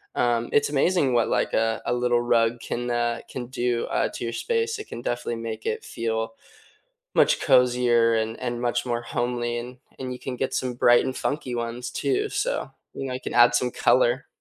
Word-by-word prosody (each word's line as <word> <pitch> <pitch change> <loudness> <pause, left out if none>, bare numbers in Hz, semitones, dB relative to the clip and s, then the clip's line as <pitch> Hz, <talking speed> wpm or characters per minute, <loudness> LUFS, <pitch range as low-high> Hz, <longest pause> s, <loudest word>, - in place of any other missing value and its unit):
um, 120 -1 +1
it's 145 - +3
amazing 145 -1 +2
what, 120 -1 +2
like, - - 0
a 115 0 +1
a 120 - 0
little 120 0 +2
rug 120 0 +2
can, 120 +1 -3
uh, 120 -1 0
can 120 -2 -6
do, 120 -2 -1
uh, - - 0
to - - -6
your 115 - -3
space; 455 - -1
it - - -7
can 120 - -7
definitely 120 -1 -2
make 110 -1 -6
it - - -2
feel 115 -1 -3 0.8
much - - +4
cozier 125 -3 +4
and 110 0 -2
and 120 -1 -3
much 120 0 0
more 120 -1 -1
homely, 120 0 -2
and 125 +2 -7 0.2
and 130 -1 -4
you 125 - -9
can 130 -2 -5
get 130 - -2
some 125 -1 -1
bright 120 0 +5
and 130 - -3
funky 140 -4 -2
ones 120 +1 -4
too, 415 +2 0
so, - - -2 0.2
you 135 - -5
know, 130 - -4
you 130 - -3
can - - -5
add 120 0 +6
some 125 - +1
color. 130 +3 +2
120 Hz, 205 wpm, -25 LUFS, 120-130 Hz, 0.8 s, add